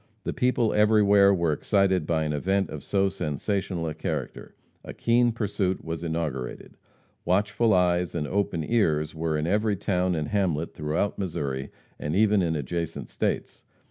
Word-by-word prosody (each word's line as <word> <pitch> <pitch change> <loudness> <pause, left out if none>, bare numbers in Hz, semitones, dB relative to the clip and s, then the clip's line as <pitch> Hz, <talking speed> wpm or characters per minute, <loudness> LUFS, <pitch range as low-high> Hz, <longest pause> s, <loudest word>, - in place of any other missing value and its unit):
The - - -3
people 125 -3 +1
everywhere 105 -2 +5
were 85 -4 +1
excited 95 0 +1
by 80 -2 +1
an 75 -1 -1
event 95 +6 0
of - - -7
so 100 -1 +1
sensational 90 +1 -2
a 80 - -3
character. 80 - -5 0.3
A - - -9
keen 120 +1 +3
pursuit 100 -4 -2
was 80 0 -4
inaugurated. 80 -6 -4 0.5
Watchful 105 +4 +2
eyes 90 -2 +2
and 75 -3 -1
open 90 -1 -1
ears 80 -8 +1
were 80 -1 -1
in 75 - -1
every 105 +4 +1
town 90 -2 0
and 75 -2 -2
hamlet 85 -6 0
throughout 80 +8 -2
Missouri, 70 -8 -3 0.3
and 75 +2 -2
even 105 0 +4
in 85 -2 0
adjacent 80 +3 -4
states. - - -3
90 Hz, 155 wpm, -26 LUFS, 80-100 Hz, 0.5 s, everywhere